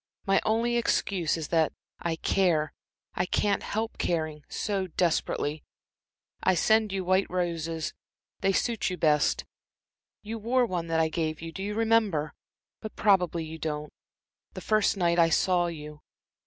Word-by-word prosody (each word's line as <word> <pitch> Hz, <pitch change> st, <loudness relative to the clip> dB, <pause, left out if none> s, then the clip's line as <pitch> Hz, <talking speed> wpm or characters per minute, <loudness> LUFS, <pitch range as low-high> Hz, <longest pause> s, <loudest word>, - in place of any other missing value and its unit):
My 195 Hz, 0 st, +3 dB
only 235 Hz, +2 st, +1 dB
excuse 185 Hz, -8 st, +1 dB
is 160 Hz, -, -5 dB
that 160 Hz, -2 st, +2 dB, 0.3 s
I 170 Hz, -1 st, -1 dB
care 165 Hz, -3 st, +1 dB, 0.4 s
I 180 Hz, -, -1 dB
can't 200 Hz, +1 st, +1 dB
help 220 Hz, +2 st, -3 dB
caring 155 Hz, -3 st, -1 dB
so 195 Hz, -3 st, -2 dB
desperately. 155 Hz, -3 st, 0 dB, 0.8 s
I 185 Hz, -, +3 dB
send 220 Hz, +3 st, +3 dB
you 190 Hz, -1 st, -2 dB
white 185 Hz, +2 st, +2 dB
roses 165 Hz, -3 st, -2 dB, 0.5 s
they 195 Hz, -, +2 dB
suit 230 Hz, +2 st, 0 dB
you 180 Hz, -, -4 dB
best. 150 Hz, -3 st, +2 dB, 0.8 s
You 225 Hz, +2 st, -5 dB
wore 245 Hz, +3 st, +2 dB
one 175 Hz, -6 st, -3 dB
that 165 Hz, 0 st, +1 dB
I 160 Hz, 0 st, +2 dB
gave 155 Hz, -1 st, -2 dB
you 165 Hz, 0 st, -6 dB
do 190 Hz, -, -7 dB
you 205 Hz, +1 st, -3 dB
remember? 220 Hz, -9 st, +2 dB, 0.5 s
but 215 Hz, -, -7 dB
probably 180 Hz, -5 st, +2 dB
you 160 Hz, +1 st, -8 dB
don't 150 Hz, -1 st, -4 dB, 0.6 s
the -, -, -6 dB
first 215 Hz, -1 st, +2 dB
night 170 Hz, -2 st, +2 dB
I 165 Hz, -1 st, +5 dB
saw 175 Hz, +2 st, +2 dB
you. 150 Hz, -2 st, -8 dB
175 Hz, 155 wpm, -28 LUFS, 160-205 Hz, 0.8 s, I